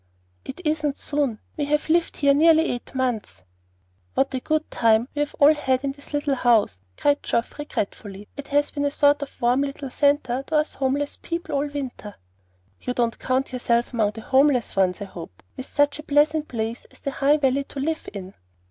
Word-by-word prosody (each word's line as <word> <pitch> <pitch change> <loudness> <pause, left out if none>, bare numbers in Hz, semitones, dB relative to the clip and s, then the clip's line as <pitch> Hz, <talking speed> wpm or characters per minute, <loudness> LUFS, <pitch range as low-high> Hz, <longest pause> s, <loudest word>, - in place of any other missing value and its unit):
"It 265 +7 -8
isn't 305 -2 0
soon. 285 -6 -1 0.2
We 295 - 0
have 300 +1 0
lived 335 +1 +1
here 280 -1 +4
nearly 320 +2 +5
eight 245 +2 -7
months." 225 - -2 0.7
"What 270 - +1
a 260 - -1
good 310 +4 -1
time 225 +1 +3
we 290 - -4
have 295 0 -1
all 295 +2 +7
had 265 -3 0
in 275 - 0
this 285 +1 -12
little 290 -1 0
house!" 230 - +2 0.2
cried 290 0 +2
Geoff, 235 +5 -2
regretfully. 205 -7 -5
"It 285 -1 -8
has 290 0 +1
been 285 0 -2
a - - +3
sort 290 0 +3
of 285 - -7
warm 245 +2 +3
little 275 -1 -4
centre 280 -3 +2
to 315 - -2
us 305 0 +1
homeless 280 +2 -1
people 335 -1 -4
all 285 +1 +1
winter." 265 -7 -6 0.7
"You 250 - -3
don't 235 -2 0
count 260 +1 -1
yourself 240 -1 0
among 215 -3 +1
the 225 - -8
homeless 265 -1 +2
ones, 190 +1 +1
I - - -3
hope, 165 - -11
with 260 - -7
such 290 0 +2
a - - -7
pleasant 300 +1 +2
place 230 0 -4
as - - -20
the 275 - -3
High 285 +2 +3
Valley 275 -1 +1
to 280 - -8
live 315 +3 -2
in." 195 -2 -8
275 Hz, 200 wpm, -24 LUFS, 240-290 Hz, 0.7 s, all